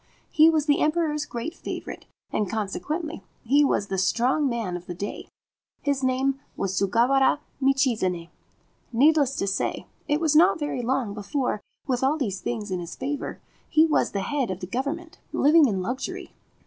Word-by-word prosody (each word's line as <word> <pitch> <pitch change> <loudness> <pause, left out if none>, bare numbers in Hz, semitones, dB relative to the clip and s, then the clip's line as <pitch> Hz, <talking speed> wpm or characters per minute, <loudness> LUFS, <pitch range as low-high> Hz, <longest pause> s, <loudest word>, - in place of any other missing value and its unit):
He 315 +1 +7
was 310 -2 +2
the 290 -2 +3
Emperor's 305 -1 +1
great 245 +8 -4
favourite, - - -7 0.2
and 210 -3 -1
consequently 300 - -3 0.2
he 280 +5 +4
was 240 -7 +1
the 195 -1 -2
strong 250 +9 +2
man 225 -7 -2
of 175 0 -8
the 175 - -5
day; 200 +4 -5 0.6
his 280 -2 0
name 260 +1 +1 0.2
was 195 -1 -1
Sugawara 240 +9 +3 0.2
Michizane. 230 -11 +1 0.6
Needless 280 +2 +4
to - - -1
say, 195 0 -2 0.2
it 295 +1 +2
was 315 -2 +1
not 330 +3 +6
very 295 -5 -2
long 245 -3 -1
before, 215 +2 -2 0.2
with 255 -4 0
all 280 +4 +2
these 205 -10 -2
things 215 -4 -3
in 185 - -1
his 170 -1 -7
favour, 280 +2 -4 0.3
he 315 +1 +5
was 315 - +2
the 200 - -2
head 270 +3 -1
of 185 -1 -3
the 180 - -5
Government, 285 - -4
living 305 +1 +5
in 190 -5 -1
luxury. 250 +7 -4
260 Hz, 170 wpm, -25 LUFS, 205-295 Hz, 0.6 s, He